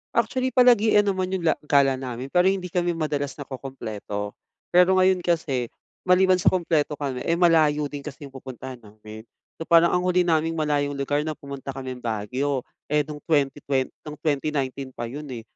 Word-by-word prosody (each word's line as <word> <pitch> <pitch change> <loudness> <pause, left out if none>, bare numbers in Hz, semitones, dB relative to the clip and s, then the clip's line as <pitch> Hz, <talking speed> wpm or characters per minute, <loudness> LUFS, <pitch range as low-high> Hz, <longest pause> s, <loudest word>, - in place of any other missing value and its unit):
Actually, 255 +3 0
palagian 225 -4 +5
naman 190 -2 -1
yung 180 - -4
la, 165 - +4
gala 135 -2 +3
namin 130 +1 -6
pero 180 +1 +4
hindi 190 -2 -1
kami 175 -1 0
madalas 145 -3 -2
nakukumpleto. 120 -7 -6 0.4
Pero 180 +1 +5
ngayon 185 0 +4
kasi, 155 -8 -1 0.4
maliban 185 0 +5
sa - - -1
kumpleto 160 -5 +2
kami, 135 -3 -4
eh, 170 - +3
malayo 155 -4 +3
din 145 - -5
kasi 150 0 -9
yung 140 - -9
pupuntahan 130 -1 -8
namin. 110 0 -13 0.3
So, 165 - -5
parang 170 +1 +5
ang 180 0 +1
huli 180 0 +3
naming 165 -2 +1
malayong 145 -2 0
lugar 145 +2 -1
nung 155 -1 -3
pumunta 140 -1 -7
kaming 130 -1 -6
Baguio, 125 +5 -2 0.3
eh 150 0 +2
no'ng 150 +1 -8
20 145 -4 +1
twent 135 -2 0 0.2
no'ng 150 -1 -7
2019 140 -3 -2
pa 120 -1 -5
'yon, 145 +5 -7
eh. 115 - -6
150 Hz, 175 wpm, -24 LUFS, 130-175 Hz, 0.4 s, palagian